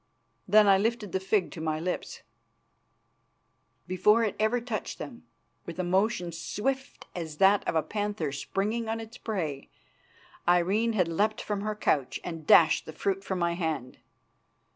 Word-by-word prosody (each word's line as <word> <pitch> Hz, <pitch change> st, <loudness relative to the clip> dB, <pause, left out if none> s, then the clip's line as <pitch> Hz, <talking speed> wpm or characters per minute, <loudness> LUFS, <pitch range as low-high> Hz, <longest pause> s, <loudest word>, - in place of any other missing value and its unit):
Then 210 Hz, +2 st, +6 dB
I 195 Hz, -1 st, +6 dB
lifted 220 Hz, -2 st, -1 dB
the 190 Hz, -, 0 dB
fig 190 Hz, 0 st, 0 dB
to 160 Hz, -, -7 dB
my 155 Hz, -1 st, -1 dB
lips. 180 Hz, +3 st, -4 dB, 1.6 s
Before 210 Hz, +4 st, +3 dB
ever 220 Hz, +3 st, +2 dB
it 240 Hz, -, -6 dB
touched 225 Hz, -4 st, -4 dB
them, 120 Hz, -5 st, -9 dB, 0.4 s
with 170 Hz, -, -6 dB
a 185 Hz, -, -1 dB
motion 180 Hz, -1 st, +1 dB
swift 260 Hz, -, -3 dB
as 160 Hz, -4 st, -6 dB
that 195 Hz, +3 st, +5 dB
of -, -, 0 dB
a 160 Hz, -, +2 dB
panther 205 Hz, -8 st, -2 dB
springing 215 Hz, +9 st, -2 dB
on 225 Hz, 0 st, -1 dB
its 225 Hz, +1 st, -10 dB
prey, 160 Hz, -11 st, -3 dB, 0.8 s
Irene 190 Hz, +6 st, +3 dB
had 185 Hz, -5 st, +2 dB
leapt 205 Hz, +6 st, 0 dB
from 205 Hz, -1 st, -3 dB
her 215 Hz, +1 st, -2 dB
couch 145 Hz, -10 st, 0 dB
and 165 Hz, -3 st, -7 dB
dashed 160 Hz, -2 st, +6 dB
the 160 Hz, -, -7 dB
fruit 195 Hz, +4 st, -1 dB
from 190 Hz, -, -3 dB
my 170 Hz, -1 st, +1 dB
hand. 160 Hz, -7 st, -3 dB
190 Hz, 160 wpm, -28 LUFS, 165-215 Hz, 1.6 s, Then